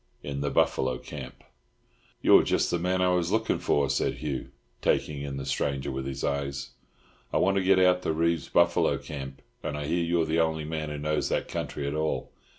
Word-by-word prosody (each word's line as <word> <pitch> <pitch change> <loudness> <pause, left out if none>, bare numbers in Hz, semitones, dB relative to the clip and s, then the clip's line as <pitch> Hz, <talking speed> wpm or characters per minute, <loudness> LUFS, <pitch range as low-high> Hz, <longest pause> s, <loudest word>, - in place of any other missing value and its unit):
IN 70 -1 -4
THE 70 - 0
BUFFALO 65 -2 +1
CAMP. - - -9 0.8
"You're - - +8
just - - +1
the 85 - +1
man 90 +1 +1
I 90 - +4
was 90 -1 +1
looking 110 +1 +1
for," 70 -1 +2
said - - 0
Hugh, 75 -4 -4 0.3
taking 75 -2 +1
in 70 -1 -4
the 70 - -5
stranger 70 0 -1
with 65 0 -4
his 70 0 -5
eyes. 70 -1 -2 0.6
"I - - +1
want 95 +1 +3
to 95 - +2
get 95 0 +5
out 90 -1 +4
to - - 0
Reeves's 85 +1 0
buffalo 85 0 +3
camp, 70 -2 -8 0.2
and 75 - -3
I 75 - -3
hear 85 +3 +1
you're 85 -1 +1
the 80 +1 +1
only 80 -1 +1
man 80 -1 -3
who 75 - -4
knows 75 +1 -1
that - - 0
country 70 - -4
at 70 - -2
all. 80 0 -2
75 Hz, 205 wpm, -28 LUFS, 70-85 Hz, 0.8 s, You're